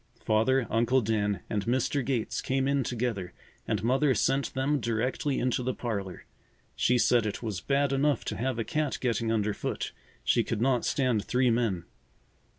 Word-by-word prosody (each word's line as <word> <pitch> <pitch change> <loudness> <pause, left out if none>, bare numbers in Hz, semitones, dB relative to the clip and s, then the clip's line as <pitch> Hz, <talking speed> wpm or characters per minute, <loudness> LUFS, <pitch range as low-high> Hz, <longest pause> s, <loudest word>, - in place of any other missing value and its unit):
Father, 115 +4 +3
Uncle 120 +4 +3
Dan, 105 -4 0
and 105 -2 -1
Mr. 130 +3 +1
Gates 120 -3 -1
came 135 0 0
in 140 -1 +2
together 115 -7 -3 0.3
and 105 -2 -1
Mother 130 +3 +3
sent 135 +6 0
them 140 +2 +1
directly 125 +5 -1
into 125 0 0
the 125 0 -2
parlor. 100 -6 -4 0.5
She 125 - +3
said 120 -2 +3
it 105 - -5
was 105 -6 -3
bad 140 +2 +1
enough 140 +1 +1
to - - -3
have 130 0 -1
a 115 - 0
cat 150 +5 -1
getting 115 -2 0
underfoot; 105 -2 -1 0.3
she 120 - +3
could 115 - -3
not 125 0 +2
stand 125 -7 +1
three 125 +1 +2
men. 110 -7 0
120 Hz, 165 wpm, -28 LUFS, 110-130 Hz, 0.5 s, Father